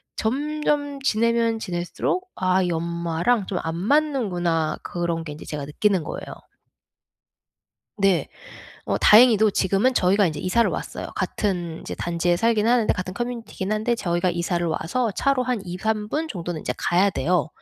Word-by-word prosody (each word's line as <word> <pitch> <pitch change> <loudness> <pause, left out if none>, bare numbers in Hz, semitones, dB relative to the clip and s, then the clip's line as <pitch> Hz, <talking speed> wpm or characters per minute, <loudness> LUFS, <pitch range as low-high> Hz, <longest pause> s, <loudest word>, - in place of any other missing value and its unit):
점점 290 +3 -1
지내면 230 -2 +2
지낼수록 180 - -3
'아 185 0 +2
이 175 - -1
엄마랑 170 +5 0
좀 185 - -2
안 160 0 -3
맞는구나.' 190 - +1
그런 170 -1 -2
게 155 - -7
인제 150 - -11
제가 145 -2 -5
느끼는 185 +4 +1
거예요. - - -6 1.7
네. 195 -3 +2 0.6
어 - - 0
다행히도 220 -1 +6
지금은 195 +6 +2
저희가 195 0 +3
인제 155 -3 -3
이사를 185 +8 +2
왔어요. - - -5
같은 175 -5 -2
이제 - - -6
단지에 175 0 0
살기는 225 +2 +2
하는데 240 -3 +3
같은 185 0 -4
커뮤니티기는 230 -3 -4
한데 220 +3 0
저희가 175 -2 0
이사를 175 0 -1
와서 185 +9 -1
차로 275 +5 +1
한 250 -3 -1
2-3 210 +4 -2
분 315 +7 -2
정도는 175 - -5
인제 - - -3
가야 185 +3 +2
돼요. 180 -2 0
195 Hz, 330 characters per minute, -23 LUFS, 175-235 Hz, 1.7 s, 다행히도